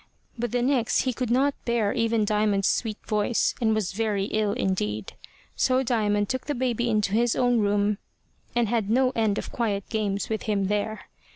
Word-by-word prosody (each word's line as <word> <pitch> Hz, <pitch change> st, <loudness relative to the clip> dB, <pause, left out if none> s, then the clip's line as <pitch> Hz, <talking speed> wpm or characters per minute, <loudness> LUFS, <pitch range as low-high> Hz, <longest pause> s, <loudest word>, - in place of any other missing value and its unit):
But 240 Hz, -2 st, -3 dB
the 245 Hz, -1 st, 0 dB
next 250 Hz, -3 st, +2 dB
he 255 Hz, -, -1 dB
could 250 Hz, -1 st, -3 dB
not 270 Hz, +4 st, +3 dB
bear 230 Hz, -4 st, +1 dB
even 230 Hz, -2 st, +1 dB
Diamond's 210 Hz, -2 st, +1 dB
sweet 220 Hz, -3 st, 0 dB
voice, 215 Hz, +1 st, +1 dB
and 220 Hz, -2 st, +3 dB
was 210 Hz, -4 st, -1 dB
very 205 Hz, -1 st, -1 dB
ill 215 Hz, -1 st, +1 dB
indeed; 110 Hz, -, -2 dB, 0.4 s
so 260 Hz, +1 st, +2 dB
Diamond 210 Hz, -4 st, +1 dB
took 260 Hz, +3 st, -3 dB
the 290 Hz, -, -1 dB
baby 240 Hz, -1 st, 0 dB
into 210 Hz, -3 st, +1 dB
his 235 Hz, +1 st, +2 dB
own 245 Hz, -2 st, +2 dB
room, 205 Hz, 0 st, +1 dB, 0.6 s
and 240 Hz, -1 st, +2 dB
had 220 Hz, -2 st, 0 dB
no 255 Hz, +3 st, +3 dB
end 220 Hz, -3 st, +1 dB
of -, -, -5 dB
quiet 205 Hz, -5 st, -2 dB
games 205 Hz, -3 st, -1 dB
with 220 Hz, -1 st, -2 dB
him 200 Hz, -2 st, +1 dB
there. 210 Hz, +1 st, -1 dB
220 Hz, 185 wpm, -26 LUFS, 205-240 Hz, 0.6 s, not